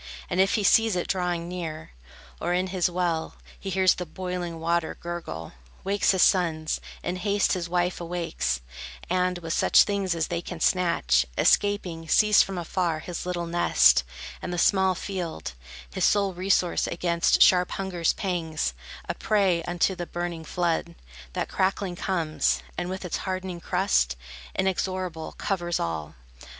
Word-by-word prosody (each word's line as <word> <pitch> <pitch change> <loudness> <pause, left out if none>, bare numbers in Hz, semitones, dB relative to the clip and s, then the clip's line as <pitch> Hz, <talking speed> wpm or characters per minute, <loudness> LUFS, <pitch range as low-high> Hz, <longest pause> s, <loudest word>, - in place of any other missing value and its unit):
And 180 - +3
if 195 - +3
he 215 - 0
sees 225 0 +4
it 175 - -1
drawing 175 -2 -1
near, 165 -3 -6 0.5
Or 175 +1 0
in 180 +1 +1
his 180 -1 +2
well 175 -2 -1 0.2
He 195 - -5
hears 190 -1 +4
the 180 - -5
boiling 180 -1 -5
water 170 0 0
gurgle, 165 - -6 0.3
wakes 200 +1 +1
His 190 -2 +5
sons, 160 -4 +2 0.2
in 180 - -2
haste 200 +2 +1
his 175 -2 -3
wife 175 0 0
awakes, 65 - -2 0.5
And, 180 0 +1
with 165 -1 -4
such - - +5
things 200 -3 -1
as 160 -1 -1
they 170 - -2
can 175 -1 -7
snatch, 65 - +2
Escaping, 180 -5 +2
sees 210 +4 +5
from 185 -3 -2
far 170 -1 -1
His 175 +2 -6
little 175 -1 -2
nest, 170 - +4 0.4
and - - -4
the 175 - -3
small 190 +1 +3
field, 175 - -5 0.4
His - - -2
sole 200 -2 +3
resource 180 -1 +1
against 170 0 +3
sharp 180 -1 +4
hunger's 180 -4 0
pangs, 165 - -2 0.3
A - - -1
prey 195 -5 +1
unto 175 +2 +1
the 175 -2 -5
burning 175 -2 -4
flood, 170 0 -1 0.4
That - - -2
crackling 190 -1 -1
comes, 170 -4 0
and 175 0 -3
with 190 0 -5
its 180 - -2
hardening 185 -2 -4
crust, 180 - +1 0.4
Inexorable, 185 -3 -2
covers 175 -4 -2
all. 80 -2 -3
175 Hz, 155 wpm, -26 LUFS, 170-185 Hz, 0.5 s, His